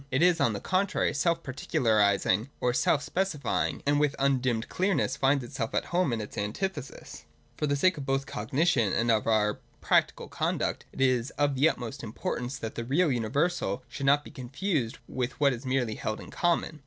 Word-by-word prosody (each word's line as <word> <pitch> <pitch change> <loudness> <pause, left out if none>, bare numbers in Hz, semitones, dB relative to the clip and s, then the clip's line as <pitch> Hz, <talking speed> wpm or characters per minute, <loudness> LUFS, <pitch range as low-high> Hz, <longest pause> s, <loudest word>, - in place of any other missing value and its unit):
It 130 +5 +2
is, 175 -2 +4
on 115 - +2
the 100 - -3
contrary, 190 - 0
self 165 +3 +1
particularising 110 -4 +1
or 125 - +1
self 145 +3 +2
specifying, 140 - -1
and 145 +1 +3
with 145 -2 +1
undimmed 130 -4 +1
clearness 190 +1 0
finds 135 0 +2
itself 115 -1 -4
at - - 0
home 175 -6 +2
in 115 - -1
its 105 - -6
antithesis. 135 - -5 0.3
For 150 - -1
the 145 - +1
sake 185 +5 +3
both 135 -1 0
of - - -15
cognition 125 - +1
and 115 0 +2
of 110 -1 +1
our 105 -2 +2 0.2
practical - - +1
conduct, - - -2
it - - -7
is 130 -1 +2
of 145 -1 +2
the 140 +4 +4
utmost 125 0 -5
importance 120 +3 -4
that 115 -3 -5
the 115 - -4
real 145 +6 +2
universal 125 - 0
should 135 +3 -4
not 145 +1 +4
be - - -10
confused 135 - -2
with 125 -1 -3
what 140 -2 +4
is 125 +2 -7
merely 130 -4 0
held 110 0 -4
in - - -11
common. 170 -2 0
135 Hz, 190 wpm, -28 LUFS, 115-150 Hz, 0.3 s, is